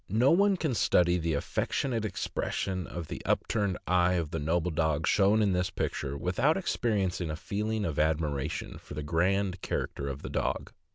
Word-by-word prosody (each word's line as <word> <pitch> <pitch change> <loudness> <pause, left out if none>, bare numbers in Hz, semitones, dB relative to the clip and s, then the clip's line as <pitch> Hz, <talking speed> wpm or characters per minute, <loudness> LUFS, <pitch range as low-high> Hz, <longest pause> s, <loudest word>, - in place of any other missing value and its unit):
No 115 +7 +4
one 195 +3 +4
can 155 -6 -1
study 90 -5 +3
the 80 -2 0
affec 70 - -2
tionate 115 -5 -1
expression 95 -1 -2
of 85 -2 -6
the - - -6
upturned 100 -5 0
eye 90 0 +3
of 85 -4 -1
the 80 - -2
noble 85 +3 0
dog 80 -1 +1
shown 105 +2 +4
in 100 -2 +2
this 90 0 +1
picture 70 0 -3
without 120 - +2
experiencing 100 - 0
a 75 - -2
feeling 105 +5 -2
of 80 -5 -2
admiration 75 -1 -1
for - - -10
the 75 - -4
grand 90 +4 +1
character 70 - -3
of 70 0 -5
the - - -5
dog. - - -2
90 Hz, 180 wpm, -29 LUFS, 80-105 Hz, -, No